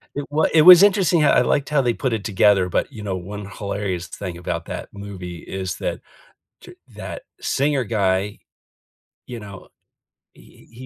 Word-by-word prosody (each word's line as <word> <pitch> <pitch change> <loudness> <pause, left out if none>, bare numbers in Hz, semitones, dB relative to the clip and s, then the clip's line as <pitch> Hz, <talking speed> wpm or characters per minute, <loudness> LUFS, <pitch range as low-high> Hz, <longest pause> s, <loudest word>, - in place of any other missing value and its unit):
It 145 - -4
w 155 +2 +2
it 155 - +6
was 180 +1 +10
interesting 190 -5 +4
how 150 - +4
I - - +4
liked 140 +3 0
how 150 -2 +2
they 120 -2 +1
put 130 -1 -2
it 110 -3 -3
together, 100 -2 +3
but, 90 - -1
you 110 -5 -9
know, 95 -2 -3
one 100 +3 -7
hilarious 100 -4 -4
thing 90 +1 -7
about 90 - -4
that - - -7
movie 95 -4 -8
is 95 -2 -5
that - - -4 0.6
t - - -14 0.2
that - - -7 0.2
singer 140 -2 0
guy, 100 -2 -1 0.9
you 120 - -7
know, 100 -3 -11 0.7
he - - -20
he 125 +3 -11
105 Hz, 175 wpm, -21 LUFS, 95-140 Hz, 0.9 s, was